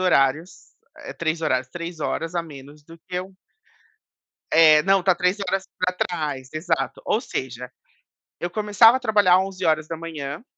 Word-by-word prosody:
horários, 160 0 0 0.2
eh, - - -8
3 165 0 -2
horários, 130 -4 0
3 170 +1 -7
horas 165 +3 -3
a 170 - 0
menos 145 -1 -13
do 165 +3 -15
que 180 -1 -3
o 185 +1 -12 1.2
É, 155 -2 +7
não, 195 +2 +3
está 185 0 +3
3 180 +3 0
horas 195 0 -2
pra 180 0 0
trás, 150 -7 -3
exato. 160 +1 -2
Ou 215 - +1
seja, 125 - -6 0.7
eu 175 - -3
começava 215 +4 +5
a - - -4
trabalhar 205 -6 +4
11h 160 -5 -3
170 Hz, 150 wpm, -23 LUFS, 150-185 Hz, 1.2 s, É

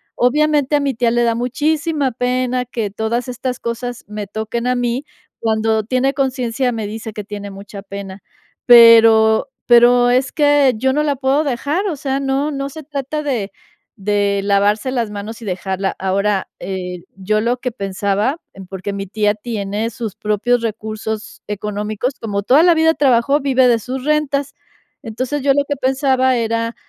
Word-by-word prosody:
Obviamente, 295 +2 +2
a - - +3
mi 280 -2 -1
tía 235 0 +1
le 240 0 +2
da 230 -1 +2
muchísima 290 +3 0
pena 250 +1 -1
que 225 -4 -4
todas 230 +4 -2
estas 250 0 -4
cosas 235 +1 -5
me 210 -1 -6
toquen 220 +3 -4
a 250 - +2
mí. 245 +2 -1 0.4
Cuando 220 -1 +1
tiene 255 +4 0
conciencia, 255 -2 -1
me 220 -2 -4
dice 220 0 -7
que 210 - -6
tiene 205 0 -7
mucha 200 0 -10
pena, 195 -1 -8 0.5
pero 225 0 +7 0.2
pero, 245 0 +6
es 255 +2 +1
que 290 -3 +4
yo 265 +3 +1
no 300 +1 +1
la 290 -2 0
puedo 275 +3 +1
dejar, 290 - -1
o 330 - -2
sea, 270 0 -2
no 275 +2 0
no 275 0 -3
se 315 +2 -10
trata 290 +1 -4
de 230 -9 -2 0.5
de 200 0 0
lavarse 205 +4 +1
las 235 -4 -1
manos 210 +3 -7
y 225 - -8
dejarla. 190 +1 -2
Ahora, 195 +1 0
eh, 180 -2 -5 0.2
yo 215 +3 0
lo 240 +3 0
que 250 -1 -3
pensaba, 200 - -1
en 190 -1 -11
porque 195 +1 -5
mi 195 -1 -5
tía 210 +1 +1
tiene 215 0 -3
sus 225 -3 -5
propios 225 +3 0
recursos 220 -1 -5
económicos, 210 +4 -3
como 200 -3 -2
toda 270 +8 +5
la 345 -2 +5
vida 320 0 +4
trabajó, 275 0 +3
vive 265 -2 +3
de 235 -2 +3
sus 255 +4 -6
rentas. 285 -2 0 0.5
Entonces, 255 +5 -3
yo 275 - +4
lo 285 +1 +2
que 285 - -1
pensaba 260 -1 +2
era, 230 0 -1
235 Hz, 170 wpm, -18 LUFS, 210-270 Hz, 0.5 s, pero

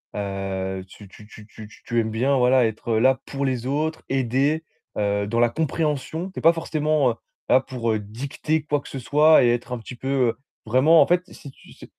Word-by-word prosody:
Heu, 95 -1 -4
tu 100 +2 -14
tu 105 +2 -16
tu 105 -1 -14
tu 110 0 -12
t - - -18
tu 120 - 0
aimes 110 -1 -1
bien, 130 +5 +1
voilà, 125 0 +4
être, 110 +1 -4
heu, 110 - +2
là 130 +2 +3
pour 140 0 -3
les 125 -2 -2
autres, 155 +3 -2
aider, 135 +4 0 0.3
heu, 100 0 0
dans 115 +3 -1
la 120 - +4
compréhension. 160 +4 -2
Tu - - -7
es - - -7
pas 165 +1 +6
forcément, 155 -4 0
heu, - - -3 0.4
là 130 - +6
pour, 125 -4 -3
heu, 110 - 0
dicter 135 +9 -3
quoi 145 0 0
que - - -13
ce 135 - -6
soit 150 +5 +5
et 120 - +4
être 120 +1 -2
un - - -2
petit 120 +3 -10
peu, 130 - -8 0.2
heu, - - -4 0.3
vraiment 135 +8 +5
en - - +4
fait, 175 +1 +2
si 140 - -11
tu - - -19
ce - - -13
130 Hz, 230 wpm, -23 LUFS, 110-150 Hz, 0.4 s, pas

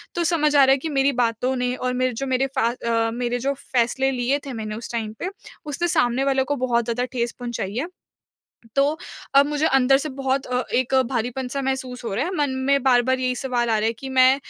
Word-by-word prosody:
तो 345 - 0
समझ 305 -3 +2
आ 280 - +7
रहा 265 - +5
है 270 - +5
कि 315 +4 -4
मेरी 275 -1 +2
बातों 235 +3 0
ने 250 0 -1
और 255 0 -2
मेरे 255 -1 0
जो 275 +4 -3
मेरे 260 +1 +1
फ़ा 230 - +3
अ, 230 -2 -1
मेरे 245 0 -2
जो 275 +3 0 0.2
फैसले 260 +3 +2
लिए 255 +3 0
थे 270 - -5
मैंने 215 -1 -5
उस 230 +2 -7
टाइम 225 -2 -3
पे, 370 - -2 0.4
उसने 305 +4 -1
सामने 245 -3 +2
वालों 270 -1 +2
को 290 - -1
बहुत 235 -1 +2
ज़्यादा 245 +1 -1
ठेस 235 -1 -1
पहुँचाई 230 -4 -4
है। 285 +8 -1 0.9
तो, 285 +3 +2 0.4
अब 280 +1 +7
मुझे 295 +1 0
अंदर 270 -1 +4
से 305 +2 -3
बहुत 270 0 -1
अ, 250 0 0
एक 255 +1 +1 0.2
भारीपन 250 +1 -2
सा 275 +1 -2
महसूस 260 -2 -3
हो 195 - -3
रहा 260 +8 0
है, 365 - -3
मन 290 -2 +1 0.2
में 280 -1 +4
बार-बार 260 0 +3
यही 255 -1 0
सवाल 245 -3 -1
आ 220 - +3
रहा 215 - 0
है 230 - 0
कि 265 +4 -8
मैं 260 0 +5
255 Hz, 235 wpm, -23 LUFS, 240-275 Hz, 0.9 s, आ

